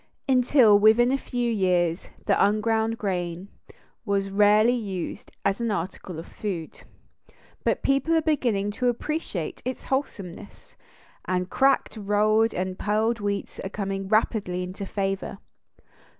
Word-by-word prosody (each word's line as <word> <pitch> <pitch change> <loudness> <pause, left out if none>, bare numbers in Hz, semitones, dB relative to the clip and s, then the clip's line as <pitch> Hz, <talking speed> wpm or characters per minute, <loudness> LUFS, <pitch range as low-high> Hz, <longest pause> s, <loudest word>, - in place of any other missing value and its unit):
Until 250 -5 +5
within 220 +4 +5
a - - +3
few 245 -3 -2
years 180 -4 +1 0.2
the - - +3
unground 220 +2 +1
grain 180 -2 -3 0.5
was 200 -2 -1
rarely 210 +3 +5
used 200 -7 -5
as 195 +3 +1
an 235 - 0
article 180 -2 -4
of 165 - -7
food, 180 -7 -6 0.8
but - - 0
people 275 +4 +2
are 325 - +4
beginning 235 -10 +1
to 250 +4 0
appreciate 245 - -3
its 255 +1 -4
wholesomeness, 210 -8 -5 0.5
and 180 0 -1
cracked, 270 -3 +2
rolled, 215 +2 +2
and 185 0 -3
pearled 220 +3 +1
wheats 205 -1 -3
are 195 - -4
coming 195 -1 -3
rapidly 200 -4 +1
into 190 +2 -6
favor. 195 -1 -3
205 Hz, 130 wpm, -25 LUFS, 195-235 Hz, 0.8 s, Until